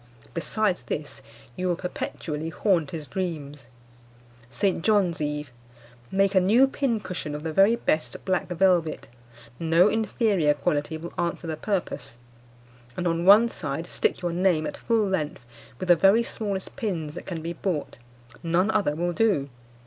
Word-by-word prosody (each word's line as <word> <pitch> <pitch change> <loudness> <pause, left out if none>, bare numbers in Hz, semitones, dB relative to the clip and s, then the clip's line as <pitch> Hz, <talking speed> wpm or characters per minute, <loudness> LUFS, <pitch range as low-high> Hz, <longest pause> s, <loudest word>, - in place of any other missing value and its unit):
Besides 190 +3 0
this, 145 -2 -5 0.3
you 185 - -2
will 175 - +1
perpetually 165 -3 -4
haunt 165 -4 +1
his 160 -3 -6
dreams. 150 -6 -5 0.8
"St. 165 +7 0
John's 195 -7 +2
Eve. 150 -2 -3 0.6
Make 195 0 +2
a 190 - +6
new 225 +8 +5
pincushion 215 - -2
of 150 - -6
the 160 -1 -3
very 195 +7 +5
best 160 -9 -2
black 185 -2 0
velvet 175 -2 +1 0.5
(no 165 +4 +4
inferior 210 -8 +1
quality 150 0 -1
will 170 +2 -8
answer 170 0 -2
the 160 -1 -3
purpose), 180 - -3 0.8
and 180 - -2
on 170 0 0
one 210 +5 +8
side 155 -6 -4
stick 180 - -1
your 175 -1 -1
name 175 -3 +2
at - - -4
full 225 -2 +1
length 155 -9 -2 0.3
with 185 - -5
the 175 - +8
very 195 +7 +5
smallest 200 -5 -4
pins 175 - -3
that - - -9
can 165 -4 -5
be 170 +1 -3
bought 170 -9 -3 0.4
(none 175 +5 +2
other 200 -9 +1
will 175 +2 -1
do). 185 -10 +1
175 Hz, 155 wpm, -26 LUFS, 155-195 Hz, 0.8 s, one